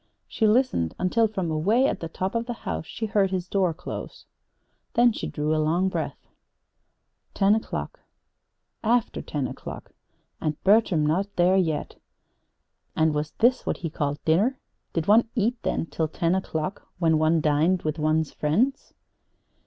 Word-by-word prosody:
She 220 - +1
listened 215 - +2
until 220 +5 +2
from 190 -6 -3
away 205 +12 +2
at - - -2
the 165 - -5
top 185 +3 -3
of 230 0 -2
the 240 - -2
house 80 -2 -3
she 225 - -4
heard 200 -2 +2
his 185 -1 -3
door 185 -2 +1
close. 165 +3 -8 0.7
Then 240 0 +5
she - - -4
drew 150 +1 -1
a 155 - +1
long 170 +5 +1
breath. - - -4 1.1
Ten 200 0 +4
o'clock 220 - -3 0.8
after 235 +1 +1
ten 145 -3 -3
o'clock, - - -8 0.5
and 155 -1 -1
Bertram 195 -6 +4
not 175 +7 +1
there 180 +2 +4
yet! 165 -5 -1 0.9
And 160 -1 +2
was 150 0 -2
this 245 +3 +2
what - - 0
he 165 - -2
called 145 -2 -2
dinner? 205 +12 +2 0.4
Did 165 -2 -1
one 225 +2 +5
eat, 235 +1 0
then, - - -1
till 160 -1 -2
ten 165 +2 0
o'clock, 185 -1 -3
when 165 -3 +2
one 160 +1 +3
dined 155 +4 +2
with 155 +1 -2
one's 155 0 +1
friends? 215 - 0
180 Hz, 160 wpm, -25 LUFS, 155-215 Hz, 1.1 s, Then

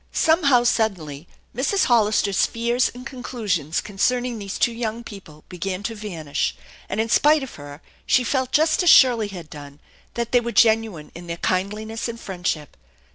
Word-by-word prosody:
Somehow, 290 -7 +3
suddenly, 175 -11 -1 0.3
Mrs. 290 - +1
Hollister's 210 -4 +2
fears 235 +2 0
and 250 +1 -10
conclusions 215 - -3
concerning 240 +4 -1
these 200 -2 -5
two 240 - +2
young 230 0 -4
people 190 -9 -12
began 185 +2 -5
to 225 - -3
vanish, 175 -9 -3 0.3
and 200 - -3
in 225 - +1
spite 295 +5 +4
of 265 - -8
her 145 +1 -11 0.2
she 250 - +3
felt 260 +1 -1
just 315 +2 +3
as 355 - +3
Shirley 240 -7 +6
had 180 -5 -9
done, 145 -1 -11 0.4
that 235 -1 -3
they 245 - +5
were 235 0 -4
genuine 220 -8 +2
in 175 +1 -10
their 170 0 -4
kindliness 210 +6 -2
and 230 0 -6
friendship. 180 -7 -4
220 Hz, 165 wpm, -22 LUFS, 180-245 Hz, 0.4 s, Shirley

